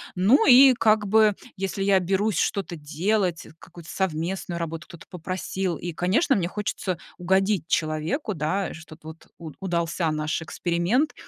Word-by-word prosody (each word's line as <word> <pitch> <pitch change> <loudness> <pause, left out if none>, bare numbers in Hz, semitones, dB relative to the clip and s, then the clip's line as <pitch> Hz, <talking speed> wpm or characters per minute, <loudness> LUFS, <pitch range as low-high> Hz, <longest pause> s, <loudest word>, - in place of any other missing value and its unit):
Ну 205 +10 +4
и, 265 0 +8
как 215 -3 +2
бы, 215 0 +4 0.2
если 195 0 -3
я 195 -1 +4
берусь 190 +1 0
что-то 190 -4 -1
делать, 175 +4 -1
э, - - -14
какую-то 170 -2 -14
совместную 175 0 -3
работу 165 0 -5
кто-то 170 -3 -13
попросил, 185 +1 -3
и, 175 - -5
конечно, 185 - +1
мне 175 -4 0
хочется 190 -2 -3 0.2
угодить 190 -1 +1
человеку, 155 - -1
да, 180 +5 -2
что-то 160 -1 -12
вот 160 - -13
уд 160 -3 -10
удался 170 -2 -1
наш 155 +1 -2
эксперимент. 175 - 0
180 Hz, 150 wpm, -24 LUFS, 165-200 Hz, 0.2 s, и